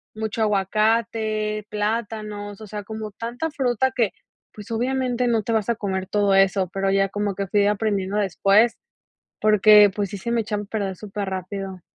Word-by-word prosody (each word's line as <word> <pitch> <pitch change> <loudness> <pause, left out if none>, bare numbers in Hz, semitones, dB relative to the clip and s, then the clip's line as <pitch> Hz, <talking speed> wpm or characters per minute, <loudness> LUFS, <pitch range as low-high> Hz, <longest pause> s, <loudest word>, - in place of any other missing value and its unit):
mucho 220 0 -3
aguacate, 215 +1 0
plátanos, 210 -1 -3
o - - -7
sea, 210 0 -6
como 215 0 -6
tanta 240 +9 -4
fruta 260 -2 0
que, 225 -7 +2 0.4
pues, 210 +1 -11
obviamente 250 +1 0
no 225 -3 +1
te 230 - -3
vas 220 -1 0
a 235 - +2
comer 190 -3 -3
todo 205 0 +2
eso, 195 0 +3
pero 195 0 0
ya 195 0 +2
como 205 0 -2
que 200 - -2
fui 205 +2 +2
aprendiendo 205 -1 0
después, 205 +3 +3 0.7
porque, 210 -1 +7
pues, 205 -2 -1
sí 200 - -5
se 235 - -5
me 235 - +2
echaba 210 -1 -3
a - - -10
perder 200 -2 -3
superrápido. 195 -1 -5
210 Hz, 170 wpm, -23 LUFS, 200-225 Hz, 0.7 s, porque